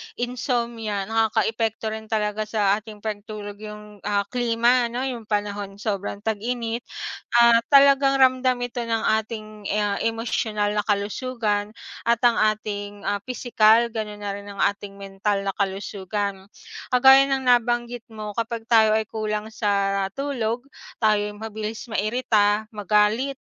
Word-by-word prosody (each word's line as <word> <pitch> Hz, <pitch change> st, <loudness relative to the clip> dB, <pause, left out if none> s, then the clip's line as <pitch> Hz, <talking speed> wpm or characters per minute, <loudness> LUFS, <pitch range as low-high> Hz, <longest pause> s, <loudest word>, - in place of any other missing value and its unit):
insomnia 235 Hz, -4 st, -2 dB
nakakaapekto 225 Hz, 0 st, 0 dB
rin 220 Hz, 0 st, -6 dB
talaga 215 Hz, -1 st, -1 dB
sa 205 Hz, -2 st, +2 dB
ating 215 Hz, -1 st, -13 dB
pagtulog 210 Hz, -1 st, -6 dB
yung, 210 Hz, -1 st, -10 dB
ah, 200 Hz, -1 st, +1 dB
klima 240 Hz, 0 st, +2 dB
ano 245 Hz, +3 st, -3 dB
yung 245 Hz, -4 st, -4 dB
panahon 205 Hz, -1 st, -2 dB
sobrang 205 Hz, -2 st, -3 dB
tag-init 230 Hz, +2 st, -2 dB, 0.5 s
ah 235 Hz, -1 st, +7 dB
talagang 275 Hz, -1 st, +6 dB
ramdam 255 Hz, -1 st, +3 dB
ito 245 Hz, 0 st, -4 dB
ng 225 Hz, -1 st, -1 dB, 0.2 s
ating, 215 Hz, 0 st, -7 dB, 0.3 s
ah, 205 Hz, -1 st, 0 dB
emosyonal 220 Hz, -2 st, -1 dB
na 210 Hz, -, +1 dB
kalusugan 210 Hz, 0 st, -1 dB, 0.3 s
at 235 Hz, 0 st, +2 dB
ang 235 Hz, -, +4 dB, 0.2 s
ating 205 Hz, -1 st, -6 dB
ah 205 Hz, 0 st, 0 dB
pisikal 235 Hz, -1 st, +3 dB
ganun 210 Hz, -2 st, -5 dB
na 200 Hz, -, -2 dB
rin 200 Hz, 0 st, -9 dB
ang 200 Hz, -, -9 dB
ating 200 Hz, 0 st, -1 dB
mental 195 Hz, 0 st, -2 dB
na 195 Hz, -, -1 dB
kalusugan. 200 Hz, 0 st, -3 dB, 0.4 s
Kagaya 265 Hz, +2 st, +7 dB
ng 270 Hz, -1 st, 0 dB
nabanggit 240 Hz, -1 st, +1 dB
mo 215 Hz, -2 st, -7 dB
kapag 230 Hz, 0 st, -3 dB
tayo 220 Hz, -2 st, +5 dB
ay 220 Hz, -, 0 dB
kulang 215 Hz, 0 st, -3 dB
sa 200 Hz, -2 st, 0 dB
tulog 245 Hz, -4 st, -2 dB, 0.3 s
tayo'y 210 Hz, -1 st, +1 dB
mabilis 220 Hz, 0 st, -5 dB
mairita 215 Hz, -1 st, +2 dB
magalit. 210 Hz, +6 st, +1 dB
220 Hz, 135 wpm, -24 LUFS, 205-235 Hz, 0.5 s, ah